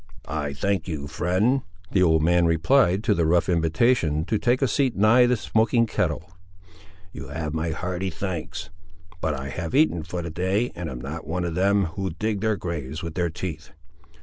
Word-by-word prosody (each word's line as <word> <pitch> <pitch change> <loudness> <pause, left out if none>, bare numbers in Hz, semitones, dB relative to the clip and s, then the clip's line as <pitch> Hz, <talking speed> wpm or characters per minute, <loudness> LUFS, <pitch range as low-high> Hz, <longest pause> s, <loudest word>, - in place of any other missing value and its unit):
"I 75 -1 -3
thank 95 +6 -1
you, 75 -5 -4
friend," 95 - +1 0.3
the 95 - +2
old 80 -3 +4
man 85 +1 +4
replied 90 - +3
to 110 - +3
the 85 -5 +1
rough 85 +1 +3
invitation 80 -1 +2
to 110 +2 0
take 125 +3 +2
a - - +4
seat 135 -1 +1
nigh 115 +5 +5
the 125 0 +2
smoking 115 +1 +2
kettle; - - -2 0.9
"you - - -8
have 75 +1 -4
my 80 +1 -1
hearty 90 +4 -3
thanks; 90 -1 -5 0.5
but 80 -2 0
I 65 0 -5
have 85 - -4
eaten 140 - +3
for 85 +2 -5
the 85 - -5
day, 95 +8 0
and 85 -2 -5
am 65 -3 -6
not 75 +5 -6
one 90 +2 -2
of 85 - -2
them, 100 +3 +2
who 95 +3 -3
dig 110 -2 -1
their 110 -1 +1
graves 80 -3 -5
with 85 -1 -5
their 90 0 0
teeth. 80 -2 -6
85 Hz, 190 wpm, -24 LUFS, 80-105 Hz, 0.9 s, nigh